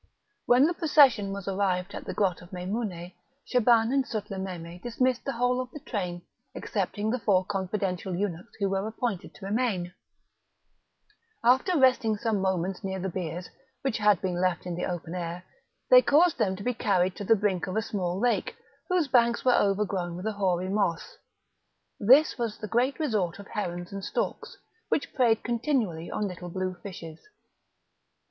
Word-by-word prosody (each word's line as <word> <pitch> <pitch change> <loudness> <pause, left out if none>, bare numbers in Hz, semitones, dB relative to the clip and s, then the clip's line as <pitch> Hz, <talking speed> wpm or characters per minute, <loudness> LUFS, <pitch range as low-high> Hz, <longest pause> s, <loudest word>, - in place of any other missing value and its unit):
When 250 +3 +6
the 340 - +1
procession 275 - +4
was 200 -1 -6
arrived 190 -1 0
at - - -7
the - - -4
grot 185 -4 +1
of 175 - -14
Meimoune, 180 -1 -4 0.3
Shaban 235 -1 +3
and 275 -1 +3
Sutlememe 190 -6 -6
dismissed 250 +1 0
the 275 - -2
whole 245 +2 +1
of 255 - -7
the 295 - -9
train, 180 - -4 0.3
excepting 215 +1 -2
the 250 - -1
four 195 -3 +2
confidential 190 -2 -2
eunuchs 180 -2 -4
who 200 - 0
were 195 +1 -1
appointed 220 -3 -4
to 195 - -10
remain. 200 -5 -1 1.5
After 260 +9 +4
resting 255 -5 +3
some 220 -2 0
moments 190 +1 -1
near 190 0 -3
the 190 +1 -2
biers, 175 0 -5 0.3
which 265 -5 -1
had 210 -3 +4
been 180 -1 -1
left 180 -2 0
in 180 - -3
the 175 - -2
open 175 -2 -5
air, 175 0 -4 0.5
they - - +10
caused 335 +1 +4
them 190 -2 +1
to 200 - -8
be 250 - 0
carried 185 -4 +1
to - - -5
the 225 +3 +5
brink 195 -3 0
of 185 - -4
a 220 - +1
small 185 -5 -2
lake, 245 +2 0 0.3
whose 360 -4 +2
banks 235 -2 +3
were 250 - +5
overgrown 195 -4 +1
with 180 +3 -7
a 220 - 0
hoary 185 -2 0
moss; 195 -5 -1 0.8
this 260 +7 +5
was 230 -3 -2
the 215 - -6
great 245 - +1
resort 210 - 0
of 200 - -10
herons 175 -3 -4
and 195 -1 -5
storks, - - -3 0.3
which 285 - -1
preyed 235 -4 +3
continually 235 - -1
on 210 - -2
little 180 -1 -7
blue 185 +1 -2
fishes. 165 -5 -8
200 Hz, 170 wpm, -27 LUFS, 180-240 Hz, 1.5 s, they